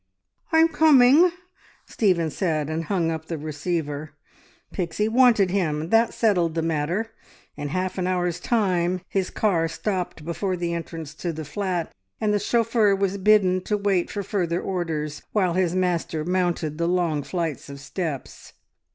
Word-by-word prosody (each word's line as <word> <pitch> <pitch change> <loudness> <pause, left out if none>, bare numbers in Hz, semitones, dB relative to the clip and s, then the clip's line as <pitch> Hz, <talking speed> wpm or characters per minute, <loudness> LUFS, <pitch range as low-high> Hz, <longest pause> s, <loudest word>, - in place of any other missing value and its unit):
"I'm 320 0 +6
coming!" 305 0 +6 0.6
Stephen 175 -7 +1
said, 155 -5 -1
and 165 +1 -2
hung 170 -2 0
up 160 -1 -5
the 165 - -3
receiver. 150 0 -4 0.6
Pixie 180 +4 -1
wanted 225 -5 +4
him, 160 -5 -1
that 225 +2 +4
settled 180 -8 +1
the 165 - 0
matter. 165 +8 -1 0.4
In 145 - -4
half 185 +5 -2
an 180 - 0
hour's 180 -2 -1
time 185 -5 +1
his 190 -2 -1
car 175 -6 +1
stopped 180 -2 -3
before 185 +2 -2
the 170 -1 -2
entrance 165 -2 -6
to 170 +2 -4
the 155 -1 -6
flat, 180 +2 -3 0.3
and 210 -1 +1
the 205 - +2
chauffeur 225 -1 +2
was 195 0 -1
bidden 190 -2 +4
to 210 - 0
wait 200 -3 0
for 205 - -4
further 175 -3 -1
orders, 160 -6 -3
while 185 -5 +2
his 180 -1 +1
master 170 -4 -1
mounted 175 -4 -1
the 170 - +1
long 170 -4 +1
flights 155 0 -4
of 140 0 -8
steps. 150 -1 -6
180 Hz, 155 wpm, -24 LUFS, 165-200 Hz, 0.6 s, I'm